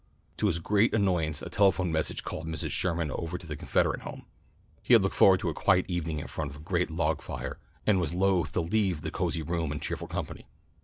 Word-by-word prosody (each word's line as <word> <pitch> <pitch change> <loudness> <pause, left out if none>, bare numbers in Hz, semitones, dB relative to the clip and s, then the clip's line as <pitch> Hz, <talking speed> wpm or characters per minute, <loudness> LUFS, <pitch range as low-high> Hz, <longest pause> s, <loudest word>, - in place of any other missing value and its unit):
To 105 - +1
his 85 -5 +1
great 105 +7 +2
annoyance 85 -7 +1
a - - -5
telephone 95 -3 +3
message 80 -1 -1
called 80 - -5
Mr. 80 -2 -3
Sherman 85 -4 0
over 85 +6 -3
to 90 - -12
the 75 -1 -5
Confederate - - 0
Home. - - -8 0.6
He - - +2
had 110 - +5
looked 95 - 0
forward 95 -1 +6
to 90 - 0
a - - -2
quiet 90 +4 +3
evening 85 -3 -2
in 75 - -4
front 75 -2 -4
of 70 - -10
the 75 - -12
great 90 +1 0
log 80 -2 0
fire, 65 +1 -6 0.3
and 100 -3 +4
was 80 - -1
loath 90 -1 +1
to 85 - +1
leave 90 -2 0
the - - -3
cosy 80 - -1
room 85 -1 -2
and 75 - -3
cheerful - - -4
company. - - -5
85 Hz, 225 wpm, -29 LUFS, 80-95 Hz, 0.6 s, forward